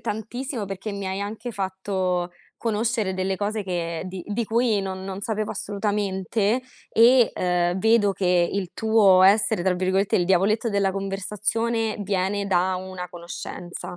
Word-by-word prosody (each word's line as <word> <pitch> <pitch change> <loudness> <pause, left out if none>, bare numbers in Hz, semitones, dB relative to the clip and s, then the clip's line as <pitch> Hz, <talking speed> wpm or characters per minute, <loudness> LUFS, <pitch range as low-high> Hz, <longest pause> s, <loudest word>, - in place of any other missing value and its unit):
tantissimo 230 +2 -4
perché 195 +2 -5
mi 200 -1 -4
hai 190 +1 -3
anche 220 +4 -5
fatto 190 -3 -2 0.3
conoscere 220 -3 -1
delle 190 +1 -1
cose 205 +1 -2
che 170 -2 -3
di 185 -1 -6
di 210 +3 -2
cui 225 -1 +1
non 190 -1 -5
non 190 0 -6
sapevo 215 0 -2
assolutamente, 205 +2 -1 0.3
e, 240 +1 +5
ehm, 180 0 0
vedo 220 -1 +4
che 180 -2 +2
il 195 -3 -2
tuo 210 -4 +5
essere, 200 -1 +4
tra 190 -1 +2
virgolette, 190 +2 0
"il 175 - +3
diavoletto 195 +5 +2
della 200 -1 +1
conversazione", 210 +3 -1
viene 200 0 -1
da 185 -1 +1
una 185 -1 -6
conoscenza. 175 0 -7
195 Hz, 145 wpm, -24 LUFS, 185-215 Hz, 0.3 s, e